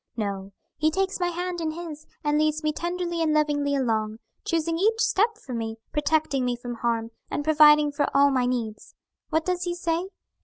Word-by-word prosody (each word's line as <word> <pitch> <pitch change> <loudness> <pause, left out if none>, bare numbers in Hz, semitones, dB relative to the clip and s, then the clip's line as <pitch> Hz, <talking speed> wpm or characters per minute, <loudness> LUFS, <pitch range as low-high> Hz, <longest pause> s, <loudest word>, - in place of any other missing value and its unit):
No; 200 -2 -3 0.3
He 310 +1 +3
takes 380 +4 -1
my 355 - +1
hand 350 0 -3
in 320 - 0
His 315 -2 -8 0.2
and 295 0 +2
leads 310 0 +1
me 305 0 +1
tenderly 345 0 -2
and 310 -1 +2
lovingly 290 -2 +1
along, 220 -5 0 0.3
choosing 330 0 0
each 445 +4 +2
step 450 -1 +2
for 265 - -9
me, 225 -1 -3
protecting 295 -2 +1
me 245 -1 0
from 240 0 -6
harm, 230 -1 -1 0.2
and 290 - -2
providing 300 -1 +6
for 290 0 0
all 280 0 +5
my 255 -2 +2
needs. 230 -4 -4 0.3
What 320 0 +1
does 360 -1 -1
He 350 0 -2
say? 345 +1 -1
305 Hz, 190 wpm, -25 LUFS, 255-340 Hz, 0.3 s, providing